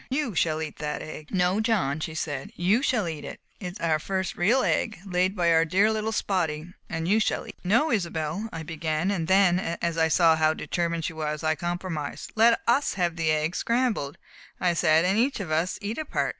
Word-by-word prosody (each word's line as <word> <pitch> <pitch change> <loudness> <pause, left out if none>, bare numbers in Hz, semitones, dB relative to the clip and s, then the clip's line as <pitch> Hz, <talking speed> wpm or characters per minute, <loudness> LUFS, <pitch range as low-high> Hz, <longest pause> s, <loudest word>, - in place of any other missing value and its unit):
You 265 -4 -1
shall 160 -1 +1
eat 155 - -7
that 150 -1 -4
egg!" 155 -1 -8
"No, 185 +1 +1
John," 200 - +1
she 160 0 -5
said, 145 -4 -4
"you 195 +8 +2
shall 235 -9 +1
eat 160 -3 -5
it. - - -8 0.2
It 180 -3 -5
is - - -11
our 160 -2 +1
first 190 +3 -2
real 235 +9 +3
egg, 220 - 0
laid 185 +1 0
by 170 -3 +2
our 165 0 +5
dear 190 +6 +3
little 220 0 -1
Spotty, 175 -6 -1 0.2
and 165 0 -3
you 210 +4 +4
shall 215 - 0
eat - - -9
it." - - -31
"No, 235 - +2
Isobel," 175 +1 -2
I 160 - -6
began, 160 +3 -1
and 170 -5 -2
then, 190 -1 +4 0.2
as 170 -1 -1
I 160 - +4
saw 165 0 +5
how 155 0 +2
determined 170 -2 -2
she - - -3
was, 155 -1 -3
I 155 0 +2
compromised. 175 -2 -4
"Let 230 +1 +5
us 270 +5 +2
have 175 -3 0
the 165 -2 0
egg 155 +2 +1
scrambled," 235 - 0 0.4
I 180 -1 +2
said, 165 -1 +3
"and 195 +4 +2
each 265 +1 +1
of 180 -6 -5
us 165 +4 0
eat 215 +7 -3
a 310 - -3
part." - - -1
175 Hz, 220 wpm, -26 LUFS, 160-205 Hz, 0.4 s, our